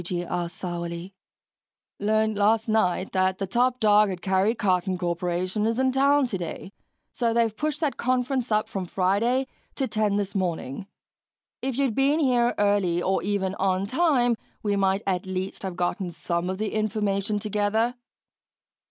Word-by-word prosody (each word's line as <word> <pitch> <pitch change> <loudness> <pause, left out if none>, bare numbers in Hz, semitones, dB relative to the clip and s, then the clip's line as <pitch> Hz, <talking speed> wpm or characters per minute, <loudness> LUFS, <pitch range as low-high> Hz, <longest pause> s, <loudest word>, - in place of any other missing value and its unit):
G.G. 175 0 -3
asked 175 -1 -3
sourly. 175 +1 -5 0.9
"Learned 215 +1 +1
last 215 +2 +2
night 195 -4 +1
that 185 0 +1
the 195 - -2
top 245 +5 +1
dog 210 -1 +5
at 180 -2 -5
Karry 190 +4 +2
Karton 185 -2 +1
Korporation 180 +4 -1
is 230 0 0
in 260 0 +2
town 280 +2 +3
today, 190 -3 -5 0.4
so 230 -2 0
they've 230 -2 +2
pushed 300 +4 -2
that 300 -4 0
conference 255 0 0
up 215 0 +2
from 190 -2 -4
Friday 205 +9 +1 0.3
to 265 - -1
ten 215 -3 0
this 200 -1 -1
morning. 180 -3 -3 0.7
If 265 -1 -2
you'd 275 -4 +1
been 275 +5 +3
here 245 -4 +2
early 200 -4 +2
or 190 +2 0
even 195 -2 -1
on 190 0 +1
time 255 -2 +2 0.3
we 205 -1 +1
might 195 0 +1
at 185 -1 -1
least 190 +1 -4
have 190 -3 -4
gotten 180 +2 -1
some 170 +1 -3
of 185 - -2
the 215 +1 -3
information 210 -1 0
together." 210 +3 0
205 Hz, 160 wpm, -25 LUFS, 185-235 Hz, 0.9 s, dog